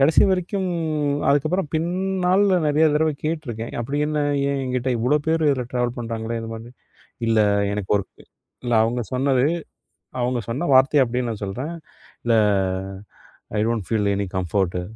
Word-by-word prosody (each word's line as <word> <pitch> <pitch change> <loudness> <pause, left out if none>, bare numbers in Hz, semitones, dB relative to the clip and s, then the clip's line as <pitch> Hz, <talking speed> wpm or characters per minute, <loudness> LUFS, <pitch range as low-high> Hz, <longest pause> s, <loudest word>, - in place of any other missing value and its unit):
கடைசி 140 +1 +5
வரைக்கும் 190 +1 -1 0.6
அதுக்கப்புறம் 155 +5 +1
பின்னாள்ல, 185 +3 +2
நெறைய 150 +2 +3
தடவை 155 0 +2
கேட்டுருக்கேன். 130 -8 -3
அப்டி 135 +5 -2
என்ன? 150 0 -1 0.3
ஏன்? 140 -1 -1
எங்கிட்ட 125 0 -1
இவ்ளோ 125 +6 +2
பேரு, 160 0 +2
இதில 130 -3 0
ட்ராவல் 120 -1 0
பண்ணுறாங்களே! 115 0 -3
இது 115 - -6
மாரி. 115 +1 -8 0.6
இல்ல 115 -1 +3 0.3
எனக்கு 100 -2 -4
ஒர்க் 100 -1 -6 0.4
இல்ல 120 - -1
அவுங்க 120 +2 0
சொன்னது, 130 0 +2 0.8
அவுங்க 125 0 0
சொன்ன 135 +9 -2
வார்த்தைய 135 +1 +5
அப்டியே 125 +1 -2
நான் 110 -2 -5
சொல்றேன். 125 +12 -4 0.5
"இல்ல 120 -1 +2 1.2
I - - +2
don't 115 -5 -1
feel 105 -3 +1
any 100 0 -1
comfort" 90 0 0
125 Hz, 145 wpm, -22 LUFS, 115-155 Hz, 1.2 s, கடைசி